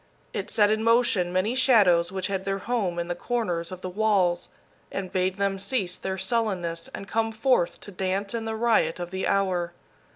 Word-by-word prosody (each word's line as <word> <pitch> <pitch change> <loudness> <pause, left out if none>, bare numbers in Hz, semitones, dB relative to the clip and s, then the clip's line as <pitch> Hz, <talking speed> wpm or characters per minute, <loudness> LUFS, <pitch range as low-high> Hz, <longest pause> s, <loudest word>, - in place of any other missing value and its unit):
It - - -3
set 210 -2 +3
in 215 0 +1
motion 230 -6 +3
many 185 +6 +1
shadows 200 -10 +4
which 190 -1 -3
had 195 -1 -2
their 195 0 -1
home 195 -4 -1
in 170 0 -2
the 175 - -1
corners 175 -4 -2
of 185 -1 -8
the 185 - -4
walls, 185 -3 +1 0.4
and 190 -2 -4
bade 185 +1 0
them 200 -1 0
cease 195 -4 0
their 190 0 -4
sullenness 185 -8 -1
and 195 - -8
come 225 +1 0
forth 225 -5 +1
to 205 - -9
dance 195 +2 -2
in 230 -1 -3
the 220 0 -3
riot 220 -8 +2
of 175 0 -5
the 190 0 -2
hour. 180 -3 0
195 Hz, 195 wpm, -26 LUFS, 180-220 Hz, 0.4 s, shadows